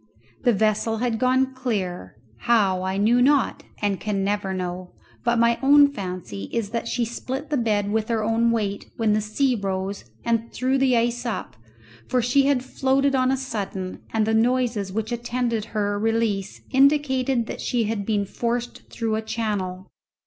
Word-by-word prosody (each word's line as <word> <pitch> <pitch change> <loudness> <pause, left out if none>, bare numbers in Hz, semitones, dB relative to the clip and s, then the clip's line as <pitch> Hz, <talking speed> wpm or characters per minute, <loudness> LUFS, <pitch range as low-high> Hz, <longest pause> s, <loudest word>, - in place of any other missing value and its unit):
The 245 - +6
vessel 220 +1 +1
had 230 -1 -1
gone 260 +1 +2
clear; 195 - -3 0.2
how, 195 - +2
I 190 +1 -2
knew 230 +5 +3
not 275 0 +3 0.2
and 200 -3 +1
can 200 -1 -1
never 200 -1 -1
know, 180 -1 -4 0.3
but 235 0 +2
my 235 0 +3
own 285 +1 +6
fancy 180 - -6
is 215 -3 -2
that 230 0 -2
she 235 0 0
split 265 +5 -5
the - - +2
bed 210 -4 0
with 220 0 0
her 225 -2 0
own 225 +2 +2
weight 210 -3 -2
when 220 -2 +2
the 215 - +2
sea 250 +6 +1
rose 195 -2 -3 0.2
and 230 0 0
threw 260 +2 0
the 260 -2 +3
ice 240 +1 0
up, 235 -3 -4 0.5
for 255 - +1
she 255 +3 +3
had 265 -3 +1
floated 270 +1 +1
on 255 -1 +2
a 265 - +2
sudden, 200 -7 -4
and 220 -1 +1
the 220 - 0
noises 230 -3 +1
which 220 +3 -3
attended 240 -2 -1
her 205 -2 -1
release 220 -3 -1
indicated 265 -3 +3
that - - -6
she 240 -2 0
had 215 -1 -2
been 205 -1 0
forced 240 +3 -3
through 225 -2 -2
a 220 - 0
channel. 205 -5 -3
225 Hz, 175 wpm, -24 LUFS, 205-250 Hz, 0.5 s, The